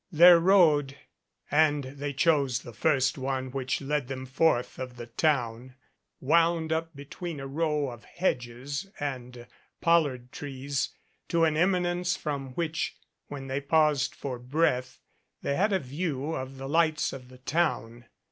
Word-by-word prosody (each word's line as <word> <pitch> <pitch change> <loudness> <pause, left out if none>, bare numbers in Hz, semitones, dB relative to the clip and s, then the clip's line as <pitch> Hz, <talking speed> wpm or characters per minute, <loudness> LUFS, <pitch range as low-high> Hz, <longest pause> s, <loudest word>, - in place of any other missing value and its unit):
Their 170 +1 +8
road, 155 -7 +4 0.5
and 150 -1 +3
they 140 +2 -5
chose 140 -3 +2
the 120 - -10
first 135 +1 +1
one 130 -1 -2
which 130 +1 -2
led 145 -1 -1
them 130 0 -5
forth 130 -1 +1
of 130 -1 -6
the 120 -1 -7
town, 125 -3 -1 0.4
wound 165 +2 +2
up 165 0 -3
between 145 +3 -7
a 135 - -6
row 150 0 0
of 120 -1 -12
hedges 140 0 -3
and 125 -4 -5 0.3
pollard 145 -7 +2
trees 140 -1 -3 0.4
to 170 -1 +2
an 155 -2 +3
eminence 180 0 +1
from 140 -4 -4
which, 165 0 -2 0.3
when 140 -2 -7
they 135 +1 -2
paused 150 -1 +2
for 130 -3 -5
breath, 130 -1 0 0.5
they 140 - 0
had 205 +6 +2
a 195 - +3
view 150 0 -3
of 130 -2 -5
the 135 0 -6
lights 160 +1 +2
of 125 -2 -9
the 130 - -13
MADCAP 130 - -33
town. 120 -8 -1
140 Hz, 150 wpm, -28 LUFS, 130-160 Hz, 0.5 s, Their